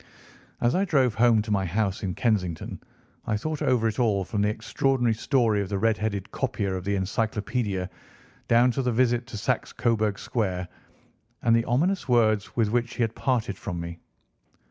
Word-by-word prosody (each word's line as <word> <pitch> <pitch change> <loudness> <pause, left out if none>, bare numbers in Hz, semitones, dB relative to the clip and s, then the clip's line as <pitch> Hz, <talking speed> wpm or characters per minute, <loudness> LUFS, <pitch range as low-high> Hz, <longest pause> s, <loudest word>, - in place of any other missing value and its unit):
As 120 +1 +3
I 190 - +2
drove 135 - +2
home 115 -1 +4
to 105 - -5
my 100 -2 +2
house 95 +2 -1
in 95 -3 -3
Kensington 95 -8 -1 0.5
I 105 - +1
thought 155 +6 -4
over 115 -3 +2
it 110 +1 -3
all, 105 -5 +2
from 100 +2 -2
the 105 - +2
extraordinary 120 +2 0
story 115 -3 +1
of 95 - -4
the 100 - -1
red 115 +2 +2
headed 100 -3 -3
copier 100 -7 -2
of 90 - -4
the 100 0 0
Encyclopædia 105 0 -1 0.6
down 120 +2 +5
to 135 - -1
the 125 -1 0
visit 120 0 +1
to 110 - -7
Saxe - - -1
Coburg 110 -3 0
Square, 95 -6 -2 0.7
and 115 -1 +4
the 115 0 +2
ominous 165 +7 0
words 110 -4 +2
with 110 -3 +1
which 120 0 0
he 120 - +1
had 115 -1 -1
parted 120 -7 -1
from 90 -3 -4
me. 85 0 -6
110 Hz, 185 wpm, -26 LUFS, 100-120 Hz, 0.7 s, down